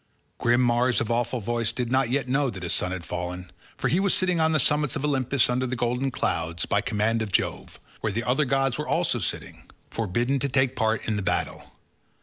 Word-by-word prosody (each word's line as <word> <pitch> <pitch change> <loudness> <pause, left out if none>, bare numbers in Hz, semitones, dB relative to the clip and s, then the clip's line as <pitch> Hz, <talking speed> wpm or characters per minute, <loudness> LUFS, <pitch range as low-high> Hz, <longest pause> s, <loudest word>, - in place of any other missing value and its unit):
Grim 120 +1 +3
Mars 120 0 +2
of 115 0 -2
awful 120 +1 0
voice 115 +1 -1
did 125 -1 -3
not 130 -2 +2
yet 135 +1 0
know 135 +1 +1
that 95 -5 -7
his 85 - -1
son 90 - 0
had 90 -3 -5
fallen, 90 +1 -5 0.3
for - - 0
he 175 - +2
was 195 -1 +2
sitting 180 -2 +1
on 160 0 +3
the 155 - +2
summits 150 0 +2
of 145 - -2
Olympus 135 -2 +2
under 125 +1 0
the 130 - -2
golden 125 +3 0
clouds, 85 -8 -2
by 100 - +1
command 110 +1 0
of 110 -2 -3
Jove, - - -2 0.2
where 110 - -1
the 115 +4 -2
other 130 +5 +2
gods 135 -1 0
were - - -3
also - - +1
sitting, - - -4 0.3
forbidden 120 +6 0
to 140 - -1
take 130 -1 +2
part 110 -1 0
in 110 - 0
the - - -1
battle. 95 - -2
120 Hz, 220 wpm, -25 LUFS, 110-135 Hz, 0.3 s, Grim